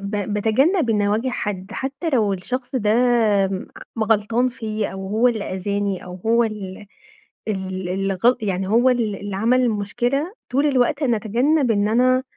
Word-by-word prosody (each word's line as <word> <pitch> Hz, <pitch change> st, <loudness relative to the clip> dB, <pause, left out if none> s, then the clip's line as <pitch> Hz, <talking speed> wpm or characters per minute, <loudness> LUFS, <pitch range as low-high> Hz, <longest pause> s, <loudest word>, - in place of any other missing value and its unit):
ب 205 Hz, 0 st, -2 dB
باتجنب 245 Hz, -, +2 dB
إني 205 Hz, -2 st, +2 dB
أواجه 220 Hz, +5 st, 0 dB
حد، 205 Hz, -4 st, -4 dB
حتى 275 Hz, +5 st, -3 dB
لو 220 Hz, -8 st, +2 dB
الشخص 245 Hz, +8 st, -4 dB
ده 210 Hz, -4 st, +1 dB, 1.0 s
م 225 Hz, -, 0 dB
غلطان 225 Hz, +3 st, +1 dB
فيّا، 215 Hz, -3 st, -3 dB
أو 190 Hz, 0 st, -7 dB
هو 220 Hz, +5 st, +2 dB
اللي 225 Hz, -4 st, -1 dB
أذاني 200 Hz, 0 st, -2 dB
أو 180 Hz, -, -8 dB
هو 235 Hz, +1 st, +4 dB
ال 205 Hz, -3 st, -5 dB, 0.6 s
ال 190 Hz, -2 st, -3 dB
اللي 195 Hz, +1 st, -1 dB
غل 245 Hz, +2 st, +5 dB
يعني 190 Hz, -3 st, -2 dB
هو 235 Hz, +5 st, +4 dB
ال 230 Hz, -5 st, 0 dB
اللي 200 Hz, 0 st, -6 dB
عمل 240 Hz, +5 st, +3 dB
المشكلة، 245 Hz, -, -1 dB, 0.2 s
طول 275 Hz, +4 st, +1 dB
الوقت 265 Hz, +1 st, +1 dB
أنا 240 Hz, -4 st, +2 dB
اتجنب 245 Hz, +6 st, +1 dB
إن 205 Hz, -1 st, +1 dB
أنا، 255 Hz, +3 st, +3 dB
220 Hz, 165 wpm, -21 LUFS, 205-250 Hz, 1.0 s, غل